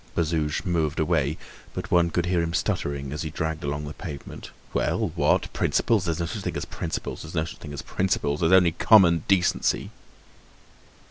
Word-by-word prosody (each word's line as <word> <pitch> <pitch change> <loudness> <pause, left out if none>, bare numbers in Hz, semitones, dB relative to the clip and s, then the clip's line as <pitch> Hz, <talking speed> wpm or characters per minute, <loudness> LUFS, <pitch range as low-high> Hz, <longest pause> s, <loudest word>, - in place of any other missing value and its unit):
Bazouge 80 -3 0
moved 80 -3 0
away, 80 -2 +1 0.4
but - - -5
one 85 -1 +4
could 85 +1 0
hear 90 -1 +1
him 85 0 -2
stuttering 70 -3 -2
as 75 - -4
he 80 - -3
dragged 80 0 -3
along 75 +1 -3
the 75 - -6
pavement: 75 -3 -8 0.2
"Well! - - 0
What? - - +1
Principles! 105 -5 +1
There's 85 -2 -1
no 85 - 0
such 100 +5 -5
thing - - -3
as - - -3
principles, 80 - -5
there's 80 +2 -9
no 80 -1 +1
such 80 - -9
thing 75 - -9
as 70 - -6
principles—there's 80 -3 0
only 90 -2 +6
common 85 -3 +5
decency!" 95 -3 +1
80 Hz, 180 wpm, -25 LUFS, 75-85 Hz, 0.4 s, only